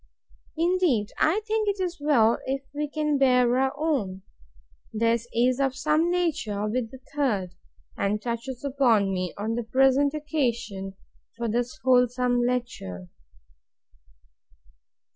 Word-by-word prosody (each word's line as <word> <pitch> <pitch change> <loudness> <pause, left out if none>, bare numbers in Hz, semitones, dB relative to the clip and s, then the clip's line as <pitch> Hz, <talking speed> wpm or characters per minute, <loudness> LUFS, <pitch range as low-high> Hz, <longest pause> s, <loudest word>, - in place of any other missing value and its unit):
Indeed, 330 - +1
I 365 +8 +3
think 435 -1 0
it 400 -1 -2
is 355 -3 -3
well 235 -7 +3
if 270 +1 -2
we 295 0 -3
can 300 -1 0
bear 250 -2 +4
our 265 0 +2
own! 225 -12 -1 0.7
This 230 +1 0
is 245 +2 +2
of 270 -2 +1
the - - -13
same 310 +4 +2
nature 305 - -1
with 230 +1 -2
the 265 - -11 0.2
third; 210 -11 0 0.4
and 205 +1 0
touches 240 +3 -5
upon 235 -8 +2
me, 185 -2 -2
on 215 +3 -2
the 240 - -1
present 270 +5 +3
occasion, 235 -10 -2 0.4
for 235 0 -2
this 240 +2 -2
wholesome 250 -1 +3
lecture. 235 - -3
250 Hz, 130 wpm, -26 LUFS, 225-290 Hz, 0.7 s, bear